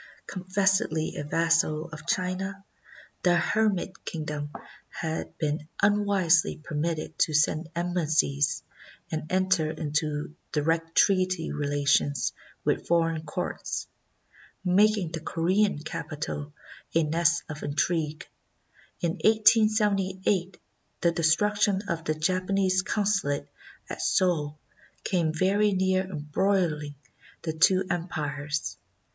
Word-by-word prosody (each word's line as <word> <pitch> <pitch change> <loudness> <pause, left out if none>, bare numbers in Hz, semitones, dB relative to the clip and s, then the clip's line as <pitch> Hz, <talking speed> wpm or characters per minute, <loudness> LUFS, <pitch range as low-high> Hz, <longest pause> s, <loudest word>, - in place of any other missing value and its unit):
Confessedly 185 -4 0
a - - -3
vassal 165 0 +1
of 160 +1 -10
China, 190 +2 -2 0.6
the 175 -1 +4
Hermit 195 +1 0
Kingdom 150 -2 -4 0.4
had 160 0 -4
been 150 0 -2
unwisely 200 -5 +3
per 155 0 -10
mitted 155 +1 -2
to 155 -4 +2
send 155 +2 +2
embassies 160 -4 +1 0.5
and 155 0 -4
enter 185 -4 +2
into 150 -1 -2 0.2
direct 165 +2 0
treaty 185 -3 +3
relations 145 -1 +1 0.3
with - - 0
foreign 165 -1 +2
courts, 180 +4 -3 0.8
making 200 -1 +3
the 165 - -4
Corean 185 +4 +1
capi 160 -1 -5
tal 145 0 -4 0.4
a 165 - +4
nest 170 +2 +2
of 155 -1 -7
intrigue. 155 +1 -1 0.8
In 170 -1 -1
1878 205 -4 +3 0.4
the 170 - +4
destruction 200 +5 +2
of 170 -4 -3
the 155 - 0
Japanese 185 +3 +1
Consulate 200 -8 0 0.4
at - - -5
Seoul 155 -5 +1 0.5
came 170 -4 +1
very 195 +5 +2
near 190 0 +2
embroiUng 155 -2 -1 0.5
the 160 - -2
two 185 +4 +4
empires. 150 -4 -3
170 Hz, 105 wpm, -27 LUFS, 155-190 Hz, 0.8 s, the